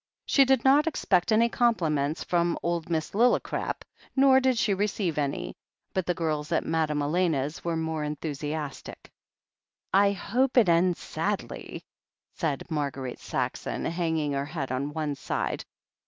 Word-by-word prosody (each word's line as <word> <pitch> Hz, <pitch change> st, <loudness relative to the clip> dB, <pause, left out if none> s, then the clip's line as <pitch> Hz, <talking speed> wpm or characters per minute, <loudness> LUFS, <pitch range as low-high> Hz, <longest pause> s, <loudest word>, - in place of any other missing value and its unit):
She 275 Hz, -, +5 dB
did 265 Hz, -2 st, +2 dB
not 285 Hz, +4 st, +5 dB
expect 190 Hz, -, +1 dB
any 225 Hz, +2 st, +5 dB
compliments 160 Hz, -12 st, +1 dB
from 170 Hz, -1 st, +1 dB
old 170 Hz, -1 st, -1 dB
Miss 160 Hz, -2 st, -1 dB
Lillicrap, 240 Hz, +4 st, +1 dB, 0.3 s
nor 265 Hz, -1 st, +6 dB
did 260 Hz, -2 st, +2 dB
she 215 Hz, -2 st, +2 dB
receive 195 Hz, -5 st, -1 dB
any, 140 Hz, -1 st, -2 dB, 0.4 s
but 185 Hz, -2 st, -1 dB
the 180 Hz, -, +1 dB
girls 155 Hz, -1 st, -2 dB
at 165 Hz, -, +1 dB
Madame 155 Hz, -2 st, 0 dB
Elena's 155 Hz, -2 st, 0 dB
were 170 Hz, -1 st, -1 dB
more 160 Hz, -1 st, -2 dB
enthusiastic. 150 Hz, -1 st, -5 dB, 0.8 s
"I 200 Hz, +1 st, +5 dB
hope 250 Hz, +7 st, 0 dB
it 220 Hz, -7 st, +6 dB
ends 170 Hz, +1 st, +3 dB
sadly," -, -, -4 dB, 0.5 s
said 145 Hz, -5 st, -2 dB
Marguerite 140 Hz, -4 st, -3 dB
Saxon, -, -, -3 dB
hang 165 Hz, -1 st, -1 dB
ing 150 Hz, -2 st, -1 dB
her 140 Hz, 0 st, -1 dB
head 145 Hz, -4 st, -4 dB
on 140 Hz, +3 st, -2 dB
one 150 Hz, -1 st, -2 dB
side. 140 Hz, -, -3 dB
165 Hz, 145 wpm, -27 LUFS, 150-200 Hz, 0.8 s, nor